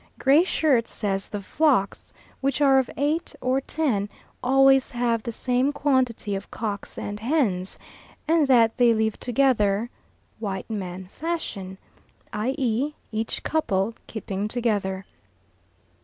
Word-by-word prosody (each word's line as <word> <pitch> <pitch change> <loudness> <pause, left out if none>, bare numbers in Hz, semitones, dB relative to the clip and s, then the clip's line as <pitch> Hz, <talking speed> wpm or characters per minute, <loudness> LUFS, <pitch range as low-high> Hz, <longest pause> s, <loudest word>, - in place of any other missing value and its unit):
Gray 280 +5 +5
Shirt 280 -10 +2
says 195 -2 -2
the 205 -1 -5
flocks, 265 -5 +1 0.3
which 275 0 0
are 270 -2 +5
of 260 - -1
eight 300 +4 -1
or 260 +2 +1
ten, 255 -10 -1 0.3
always 270 +1 +5
have 240 -2 0
the 235 - -4
same 250 +4 +1
quantity 260 -7 0
of 195 0 -5
cocks 210 -3 -5
and 205 0 -5
hens, 220 - 0 0.5
and 320 -2 +3
that 230 -4 +4
they 240 -2 +5
live 220 -1 0
together 235 -3 +2 0.5
"white 200 -1 -4
man 190 -3 -5
fashion," 195 - -5 0.6
i.e. 255 +4 0 0.2
each 220 +1 -2
couple 215 -9 0
keeping 205 -2 -4
together. 205 -5 -1
235 Hz, 125 wpm, -25 LUFS, 205-270 Hz, 0.6 s, Gray